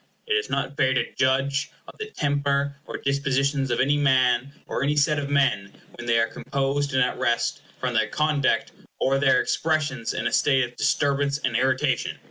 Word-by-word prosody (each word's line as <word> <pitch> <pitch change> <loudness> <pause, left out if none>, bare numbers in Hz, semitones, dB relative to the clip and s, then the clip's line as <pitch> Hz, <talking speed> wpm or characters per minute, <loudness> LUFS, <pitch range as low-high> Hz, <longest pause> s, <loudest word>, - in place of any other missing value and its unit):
It 445 - -1
is 435 0 0
not 135 +2 -2
fair 130 -1 +2
to 120 - -1
judge 135 +2 +1 0.2
of - - -11
the 435 0 -5
temper 140 - -1
or - - -5
dispositions 140 0 0
of 120 - 0
any 145 +2 +2
man, 130 -2 +2
or - - -3
any 145 +2 +1
set 150 +1 +2
of 140 -1 -4
men, 135 -9 0
when 120 - -9
they 115 0 +3
are 115 - +3
composed 140 +3 -2
and 130 - +4
at 125 - -2
rest, 120 +4 0 0.2
from 125 -1 -2
their 110 -1 +2
conduct 150 +2 0 0.3
or 135 +1 +2
their 135 -2 +4
expressions 155 -7 -1
in - - -3
a - - -1
state 135 -3 +3
of 125 0 -6
disturbance 140 0 +1
and 130 -5 -2
irritation. 130 +2 0
140 Hz, 190 wpm, -24 LUFS, 130-145 Hz, 0.3 s, and